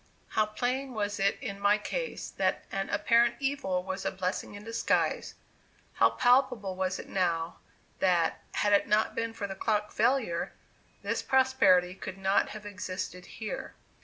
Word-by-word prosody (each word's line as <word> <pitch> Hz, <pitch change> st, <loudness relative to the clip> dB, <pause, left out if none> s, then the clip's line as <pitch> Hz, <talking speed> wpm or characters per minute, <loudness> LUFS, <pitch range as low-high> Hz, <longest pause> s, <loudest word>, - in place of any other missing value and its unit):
How 215 Hz, -1 st, +2 dB
plain 250 Hz, +4 st, -2 dB
was 205 Hz, -1 st, -2 dB
it 195 Hz, +1 st, +2 dB
in 200 Hz, -7 st, -5 dB
my 205 Hz, +1 st, +4 dB
case, -, -, -4 dB
that -, -, 0 dB
an 195 Hz, 0 st, -2 dB
"apparent 235 Hz, 0 st, +3 dB
evil" 270 Hz, -10 st, -1 dB
was 190 Hz, +1 st, -4 dB
a -, -, +1 dB
"blessing 185 Hz, +1 st, -3 dB
in 205 Hz, -, -9 dB
disguise!" 230 Hz, +1 st, 0 dB, 0.6 s
How -, -, +5 dB
palpable 245 Hz, -6 st, +2 dB
was 185 Hz, 0 st, -1 dB
it -, -, -8 dB
now, 170 Hz, -3 st, -1 dB, 0.4 s
that, 175 Hz, -3 st, +2 dB
had 205 Hz, 0 st, +2 dB
it 200 Hz, -, +4 dB
not 215 Hz, +1 st, +2 dB
been 230 Hz, 0 st, -2 dB
for 225 Hz, -2 st, -5 dB
the 195 Hz, -, -4 dB
clock 210 Hz, +2 st, 0 dB
failure, 225 Hz, -7 st, +1 dB, 0.5 s
this -, -, -1 dB
prosperity 260 Hz, -9 st, +4 dB
could 190 Hz, 0 st, -7 dB
not 195 Hz, +1 st, +2 dB
have 215 Hz, -1 st, -8 dB
existed 185 Hz, -2 st, -5 dB
here. 220 Hz, -2 st, -6 dB
205 Hz, 160 wpm, -30 LUFS, 190-230 Hz, 0.6 s, How